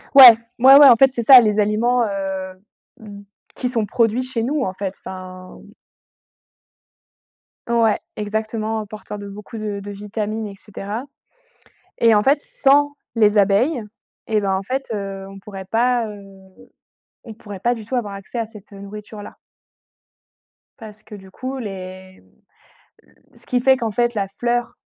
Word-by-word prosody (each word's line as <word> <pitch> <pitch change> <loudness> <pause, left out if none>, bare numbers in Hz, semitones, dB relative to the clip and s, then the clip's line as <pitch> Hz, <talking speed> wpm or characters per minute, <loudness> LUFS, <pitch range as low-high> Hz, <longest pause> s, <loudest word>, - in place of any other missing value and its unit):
Ouais, 250 -5 +11 0.2
ouais, 265 +2 +8
ouais, 285 0 +9
en 250 - +8
fait, 270 +3 +4
c'est 235 - -2
ça 255 +1 +9
les 215 -2 0
aliments, 230 +4 +1
heu, 195 -2 -4 0.5
mmh, 205 -2 -11 0.3
qui 250 - -3
sont 230 -4 -1
produits 230 +2 +1
chez 255 -3 -3
nous, 285 +5 -1
en 185 - -3
fait, 190 0 -5
enfin 185 -1 -10 2.1
Ouais, 230 -2 +2 0.2
exactement, 220 +1 -3
hein, - - -8
porteur 210 0 -9
de 200 0 -9
beaucoup 210 +3 -10
de 210 -2 -4
de 200 +1 -8
vitamines 210 +2 -5
et 200 - -10
cetera 210 +4 -7 0.9
et 230 -1 +5
en 210 - +4
fait, 275 +4 +3
sans 290 +1 +3 0.2
les 210 -2 +3
abeilles 210 +8 +2 0.5
et 220 -1 +1
bah, 195 -1 0
en 190 - -2
fait, 260 +4 -4
heu, 195 -2 -6
on 195 0 -12
pourrait 195 -1 -10
pas, 235 +3 0
heu, 205 -1 -10 1.0
on 225 - -10
pourrait 205 -3 -10
pas 240 +4 +1
du 225 -3 -9
tout 255 +4 -4
avoir 215 -5 -3
accès 195 +5 -8
à 230 - -2
cette, 215 -2 -15
heu, 200 - -11
nourriture-là 205 +1 -10 1.4
parce 215 -3 -12
que 210 - -12
du 190 -1 -14
coup 260 +4 -6
les 185 - -9 0.8
le - - -28 0.2
ce - - -15
qui 250 - 0
fait 265 +1 +4
qu'en 230 -3 -3
fait 240 +3 0
la 200 -2 -2
fleur, 240 +4 -2
215 Hz, 165 wpm, -20 LUFS, 200-240 Hz, 2.1 s, Ouais